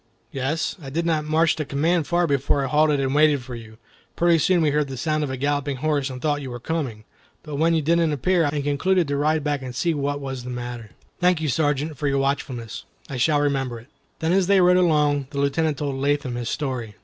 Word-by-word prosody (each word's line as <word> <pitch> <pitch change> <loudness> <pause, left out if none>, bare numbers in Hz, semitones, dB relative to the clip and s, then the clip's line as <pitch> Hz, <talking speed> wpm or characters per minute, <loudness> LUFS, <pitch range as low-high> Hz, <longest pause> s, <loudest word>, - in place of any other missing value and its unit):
"Yes; 140 +8 -2
I 135 - -7
did 165 +5 -2
not 155 -2 0
march 160 +2 +2
the 155 - -1
command 155 +3 0
far 175 0 +2
before 140 -1 +1
I - - -2
halted 150 +1 +3
and 135 0 0
waited 150 -3 +3
for 125 +1 -8
you. 110 -2 -10 0.4
Pretty 170 -1 +3
soon 175 +1 +3
we 150 - +2
heard 150 0 +1
the 135 -1 -6
sound 155 +1 0
of 145 - -2
a 130 - -4
galloping 145 +1 -1
horse, 145 0 -1
and 130 -1 -7
thought 145 0 0
you 135 - -6
were 120 0 -6
coming. 130 -6 -3 0.4
But 150 -3 -6
when 165 +2 +3
you 160 - +1
didn't 165 +1 +2
appear, 170 +5 +1
I - - +2
became - - +1
alarmed 145 - -4
and 145 - -1
concluded 170 +5 +1
to 140 - 0
ride 155 +1 +1
back 145 -2 -1
and 125 -1 -7
see 170 +5 +1
what 145 -1 -2
was 135 -3 -5
the 125 - -7
matter." 120 -2 -6 0.3
"Thank 180 -2 +3
you, 155 -2 -1
Sergeant, 145 +1 0
for 150 - -1
your 140 0 +1
watchfulness. 130 -5 -3 0.3
I 135 - -3
shall 145 +4 +2
remember 135 -4 -1
it." 120 +4 -18 0.3
Then 160 +2 +1
as 190 -1 +2
they 200 -1 +5
rode 180 0 +5
along, 150 -5 +2
the 140 - -5
Lieutenant 145 +2 +1
told 140 -2 -3
Latham 140 -1 0
his 120 -1 -3
story. 125 -7 -3
145 Hz, 245 wpm, -23 LUFS, 135-160 Hz, 0.4 s, they